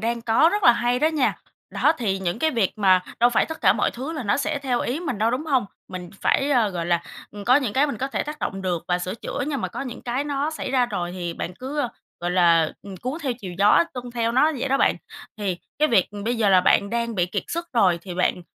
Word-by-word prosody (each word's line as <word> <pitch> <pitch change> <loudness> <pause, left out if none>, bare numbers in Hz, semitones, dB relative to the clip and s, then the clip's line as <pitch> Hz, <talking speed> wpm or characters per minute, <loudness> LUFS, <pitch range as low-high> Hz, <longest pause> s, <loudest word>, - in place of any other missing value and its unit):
đang 235 +1 -2
có 230 +8 +4
rất 410 -1 0
là 240 - +8
hay 245 +1 0
đó 310 - +3
nha. 305 -5 0 0.3
Đó, 310 - +3
thì 195 -5 -1
những 180 +1 -2
cái 315 +5 +2
việc 230 -9 +1
mà 185 -2 +5 0.2
đâu 240 +1 +5
phải 230 - +2
tất 320 - -7
cả 190 -4 +5
mọi 210 - 0
thứ 270 +7 -6
là 300 - -4
nó 205 +3 +1
sẽ 305 0 -1
theo 255 -3 -1
ý 265 +7 -2
mình 270 - -3
đâu, 225 +2 +2
đúng 275 +6 -3
hông? 265 -7 +2 0.2
Mình 180 -1 -7
phải, 280 +1 +2
a, 240 -6 +3
gọi 175 -3 -4
là, 170 -1 +1 0.3
ừm, 205 -1 -9
có 250 +4 +5
những 255 -8 0
cái 285 +3 +3
mình 255 -7 -4
có 265 +1 -2
thể - - -2
tác 300 +1 -7
động 195 -7 -4
được 175 -3 -2
và 180 0 +2
sửa 180 +2 -4
chữa, 285 +4 -4
nhưng 285 -3 -2
mà - - -2
có - - -7
những 255 -3 -6
cái 250 +4 -2
nó 285 +1 -1
xảy 315 -4 -5
ra 255 -2 +3
rồi 175 -6 -3
thì 175 -2 -4
bạn 180 - -5
cứ, 270 +6 -6
a, 250 - 0 0.3
gọi 175 0 -2
là, 170 -3 +4
ừm, 195 -2 -9
cuốn 255 - -4
theo 265 - 0
chiều 195 -7 -8
gió, 205 +11 +5
tuân 245 -1 -6
theo 230 -1 -1
nó 300 +6 +4
vậy 265 - -2
đó 270 - +3
bạn. - - +3 0.4
Thì 190 -4 -2 0.2
cái 305 - +3
việc, 200 -8 +3
ừm, 205 0 -7
bây 240 +1 0
giờ 215 -3 +2
là 185 -1 +6
bạn 200 +2 +3
đang 235 -1 -1
bị 175 -2 +1
kiệt 200 +2 -3
sức 340 +1 -3
rồi 185 -7 +3
thì 180 -3 -7
bạn, 180 0 0
235 Hz, 280 wpm, -23 LUFS, 190-275 Hz, 0.4 s, là